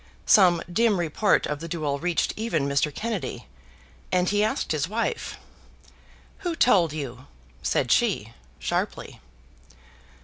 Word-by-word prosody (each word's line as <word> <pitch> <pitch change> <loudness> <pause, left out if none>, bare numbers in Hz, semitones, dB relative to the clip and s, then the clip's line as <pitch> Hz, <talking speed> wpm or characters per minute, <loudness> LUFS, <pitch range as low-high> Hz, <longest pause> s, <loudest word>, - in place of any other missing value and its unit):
Some 180 -5 +5
dim 220 -2 +3
report 175 +5 +2
of 150 -1 -3
the 165 - -6
duel 150 -4 -2
reached 175 +1 0
even 190 -11 -1
Mr. 140 +2 +1
Kennedy, 215 +4 -4 0.7
and 180 0 +2
he 205 0 +2
asked 215 - -1
his 155 +2 0
wife. 230 +2 -2 1.0
"Who 350 -4 -3
told 190 - +4
you?" 135 -4 -6 0.3
said - - 0
she, - - +1 0.2
sharply. - - -3
175 Hz, 125 wpm, -25 LUFS, 150-215 Hz, 1.0 s, Some